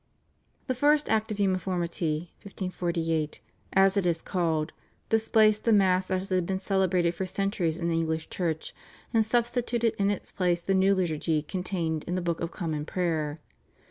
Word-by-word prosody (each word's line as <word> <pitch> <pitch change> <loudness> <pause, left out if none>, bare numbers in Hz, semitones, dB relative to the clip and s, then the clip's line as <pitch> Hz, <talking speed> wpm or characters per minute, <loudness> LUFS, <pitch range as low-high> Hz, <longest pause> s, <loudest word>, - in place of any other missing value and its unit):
The 260 - 0
first 295 +3 +3
Act 220 0 +1
of 210 -1 -4
Uniformity 175 -4 -1
(1548), 170 -5 -2 0.3
as 195 0 +5
it 195 -3 +2
is 165 -2 0
called, 165 -4 0 0.4
displaced 220 -1 +3
the 230 - +3
Mass 190 -3 +3
as 190 0 -1
it - - +2
had 180 -2 +1
been 190 - 0
celebrated 185 -3 +1
for 185 +2 -3
centuries 185 -4 -1
in 170 -1 -2
the 165 -1 +1
English 160 -1 -2
Church, 165 -4 -2 0.4
and 225 -1 +4
substituted 235 0 +1
in 200 0 +3
its 205 - -3
place 180 -2 +1
the 195 - 0
new 190 +1 +4
liturgy 160 -3 0
contained 170 -3 -2
in 180 - -2
the 185 - -1
/Book 170 -1 -1
of 170 - -2
Common 160 -5 -3
Prayer 160 -3 -2
185 Hz, 170 wpm, -28 LUFS, 165-200 Hz, 0.4 s, as